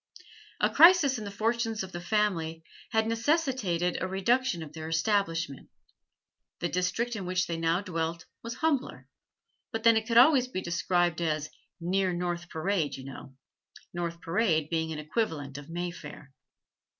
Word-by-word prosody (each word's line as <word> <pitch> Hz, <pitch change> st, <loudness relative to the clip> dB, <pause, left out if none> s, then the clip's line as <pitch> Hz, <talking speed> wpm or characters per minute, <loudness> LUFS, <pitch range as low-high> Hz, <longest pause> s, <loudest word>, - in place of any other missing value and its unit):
A -, -, +4 dB
crisis 315 Hz, -5 st, +6 dB
in 215 Hz, -, -6 dB
the -, -, -4 dB
fortunes 225 Hz, +1 st, -1 dB
of 190 Hz, -, -8 dB
the 175 Hz, -, -6 dB
family 175 Hz, -5 st, 0 dB, 0.3 s
had 220 Hz, -1 st, +2 dB
necessitated 230 Hz, -, 0 dB
a 185 Hz, -, 0 dB
reduction 195 Hz, 0 st, +1 dB
of 155 Hz, -1 st, -11 dB
their 160 Hz, 0 st, -6 dB
establishment; 165 Hz, -, 0 dB, 0.9 s
the 175 Hz, -, -1 dB
district 225 Hz, +7 st, -1 dB
in 195 Hz, -4 st, -5 dB
which 185 Hz, 0 st, +1 dB
they 170 Hz, -, -3 dB
now 165 Hz, +2 st, +1 dB
dwelt 165 Hz, -3 st, -3 dB, 0.2 s
was 230 Hz, +1 st, -6 dB
humbler, 290 Hz, -1 st, -1 dB, 0.6 s
but 225 Hz, -1 st, -4 dB
then 230 Hz, -1 st, +6 dB
it 220 Hz, 0 st, 0 dB
could 230 Hz, -, +2 dB
always 255 Hz, 0 st, +7 dB
be 250 Hz, -, -4 dB
described 175 Hz, -1 st, 0 dB
as 155 Hz, -2 st, -1 dB, 0.3 s
'near 185 Hz, +2 st, 0 dB
North 175 Hz, 0 st, -3 dB
Parade, 160 Hz, -2 st, -1 dB
you 130 Hz, -, -9 dB
know'; 135 Hz, 0 st, -10 dB, 0.6 s
North 170 Hz, -1 st, -3 dB
Parade 165 Hz, -4 st, +1 dB
being 160 Hz, -1 st, -1 dB
an 155 Hz, -, -4 dB
equivalent 150 Hz, -, -3 dB
of 145 Hz, -, -12 dB
Mayfair. 165 Hz, -5 st, -6 dB
180 Hz, 155 wpm, -29 LUFS, 165-225 Hz, 0.9 s, always